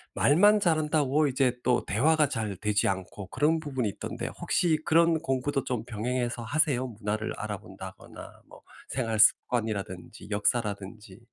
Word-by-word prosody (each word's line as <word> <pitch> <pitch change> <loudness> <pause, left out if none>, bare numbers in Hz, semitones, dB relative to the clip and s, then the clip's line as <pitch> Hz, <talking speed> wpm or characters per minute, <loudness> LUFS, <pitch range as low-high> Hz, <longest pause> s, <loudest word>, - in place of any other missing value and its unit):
말만 205 +8 +5
잘한다고 155 -3 +2
이제 130 -2 +1
또 125 -1 +2
대화가 150 +5 +2
잘 110 -7 -3
되지 105 +1 +1
않고 95 +1 -5
그런 155 +4 +1
부분이 130 -8 -2
있던데 - - -5
혹시 165 -3 +1
그런 165 0 +4
공부도 135 -2 -1
좀 125 -4 -2
병행해서 120 +1 -3
하세요? 140 -1 +1
문화를 110 -1 -3
알아본다거나 - - -9
뭐 - - -15 0.3
생활 115 -4 -2
습관이라든지 110 -3 +1
역사라든지. 105 0 -2
125 Hz, 335 characters per minute, -28 LUFS, 110-150 Hz, 0.3 s, 말만